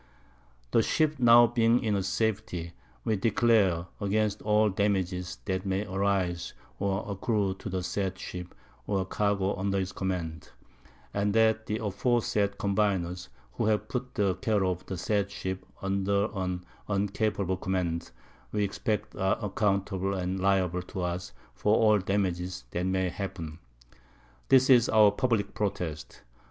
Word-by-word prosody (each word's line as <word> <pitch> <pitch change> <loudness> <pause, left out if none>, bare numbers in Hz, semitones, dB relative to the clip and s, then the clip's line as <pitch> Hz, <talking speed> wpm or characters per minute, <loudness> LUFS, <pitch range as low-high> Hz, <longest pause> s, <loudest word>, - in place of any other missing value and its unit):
The - - +5
Ship 155 +4 +1
now 120 -1 +8
being 115 +1 +2
in 105 -3 +1
safety, 95 -4 -2 0.3
we 110 - +1
declare 100 -5 +3
against 105 +1 0
all 105 0 +3
Damages 95 -2 -1
that 95 -2 -1
may 95 +1 -1
arise 95 -3 -1 0.2
or 100 0 -1
accrue 100 0 0
to - - -6
the 95 -1 -2
said 95 +1 -2
Ship, 90 -1 -7 0.4
or 95 -2 0
Cargo 100 0 0
under 100 +1 -1
his 95 -1 -1
Command; 90 -5 -4 0.6
and 100 +1 0
that 110 0 +3
the 105 - -1
aforesaid 105 -1 0
Combiners, 95 -6 0 0.3
who 115 - -1
have 105 -1 +1
put 125 0 -4
the 100 -5 +2
Care 105 0 0
of 90 -1 -1
the 95 - -4
said 100 +2 0
Ship 95 -1 -4 0.2
under 100 +2 +1
an 90 -2 -3 0.2
uncapable 100 -1 0
Command, 90 -3 -1 0.4
we 105 -1 0
expect 105 +2 -2
are 95 +3 +1
accountable 100 -2 0
and 95 0 -2
liable 95 -2 +2
to 90 +1 -6
us 90 0 -3 0.2
for 105 - +2
all 105 -2 +5
Damages 95 -2 -1
that 90 +1 -1
may 95 -1 +1
happen. 85 -4 -6 0.9
This 130 0 +6
is 125 -3 +6
our 105 -2 +6
publick 115 -1 0
Protest. 90 -7 -4
100 Hz, 140 wpm, -28 LUFS, 95-105 Hz, 0.9 s, now